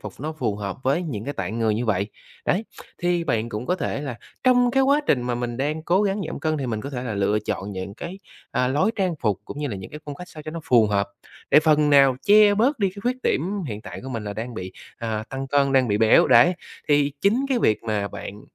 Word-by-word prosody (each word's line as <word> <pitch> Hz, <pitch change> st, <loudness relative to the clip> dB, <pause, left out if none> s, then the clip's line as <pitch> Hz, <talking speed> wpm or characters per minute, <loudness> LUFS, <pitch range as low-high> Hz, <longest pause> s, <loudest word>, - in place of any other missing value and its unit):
phục 105 Hz, -3 st, -7 dB
nó 155 Hz, +3 st, -3 dB
phù 120 Hz, -10 st, -2 dB
hợp 100 Hz, -2 st, -4 dB
với 140 Hz, +7 st, +2 dB
những 120 Hz, -, -5 dB
cái 145 Hz, -, -4 dB
tạng 100 Hz, +5 st, -3 dB
người 110 Hz, -2 st, +2 dB
như 115 Hz, -, -1 dB
vậy. 100 Hz, -2 st, +1 dB, 0.4 s
Đấy, 195 Hz, +5 st, +1 dB, 0.3 s
thì 175 Hz, -1 st, 0 dB
bạn 115 Hz, -3 st, 0 dB
cũng 110 Hz, +3 st, -5 dB
có 180 Hz, -, +2 dB
thể 160 Hz, -, -2 dB
là 130 Hz, -5 st, -5 dB, 0.3 s
trong 245 Hz, -1 st, +5 dB
cái 270 Hz, +2 st, +3 dB
quá 280 Hz, +2 st, +4 dB
trình 125 Hz, -, +2 dB
mà 125 Hz, 0 st, -1 dB
mình 120 Hz, 0 st, -3 dB
đang 150 Hz, +4 st, -2 dB
cố 180 Hz, +5 st, +2 dB
gắng 200 Hz, 0 st, 0 dB
giảm -, -, -6 dB
cân 155 Hz, +1 st, 0 dB
thì 135 Hz, -, -3 dB
mình 110 Hz, -3 st, -2 dB
có 140 Hz, -, -6 dB
thể 125 Hz, -3 st, -4 dB
là 120 Hz, -4 st, -3 dB
lựa 100 Hz, +1 st, +1 dB
chọn 100 Hz, 0 st, -3 dB
những 95 Hz, +1 st, -6 dB
cái, 175 Hz, -, -7 dB, 0.3 s
à, 125 Hz, -, +1 dB
lối 145 Hz, +11 st, +2 dB
trang 185 Hz, -4 st, 0 dB
phục, 105 Hz, -5 st, 0 dB
cũng 140 Hz, -, -8 dB
như 150 Hz, -, -2 dB
là 105 Hz, -, -4 dB
những 95 Hz, -1 st, -9 dB
cái 150 Hz, -, -9 dB
phong 145 Hz, -, -5 dB
cách 180 Hz, +5 st, -10 dB
sao 155 Hz, -, -10 dB
cho 155 Hz, -, -6 dB
nó 165 Hz, +1 st, -6 dB
phù 115 Hz, -4 st, +5 dB
hợp 100 Hz, -1 st, 0 dB, 0.4 s
để -, -, +7 dB
phần 150 Hz, -1 st, +3 dB
nào 135 Hz, -3 st, +6 dB
che 205 Hz, 0 st, +6 dB
bớt 250 Hz, +7 st, +2 dB
đi 200 Hz, -3 st, +2 dB
cái 200 Hz, +2 st, -10 dB
khuyết 250 Hz, +2 st, 0 dB
điểm 190 Hz, +5 st, 0 dB
hiện 105 Hz, -2 st, -5 dB
tại -, -, -8 dB
của 130 Hz, -, -7 dB
mình 115 Hz, -5 st, -4 dB
là 105 Hz, -, -4 dB
đang 115 Hz, +3 st, -6 dB
bị, 95 Hz, -3 st, -6 dB, 0.2 s
à, 110 Hz, -2 st, -3 dB
tăng 135 Hz, 0 st, -5 dB
cân, 140 Hz, 0 st, +2 dB
đang 130 Hz, -2 st, +3 dB
bị 105 Hz, 0 st, +1 dB
béo 110 Hz, -1 st, +5 dB
đấy. 125 Hz, +10 st, +6 dB, 0.3 s
Thì 145 Hz, -1 st, +3 dB
chính 230 Hz, +8 st, +2 dB
cái 260 Hz, -, +2 dB
việc 110 Hz, -, +2 dB
mà 105 Hz, -3 st, -1 dB
bạn 100 Hz, +1 st, -8 dB
135 Hz, 270 wpm, -23 LUFS, 110-175 Hz, 0.4 s, để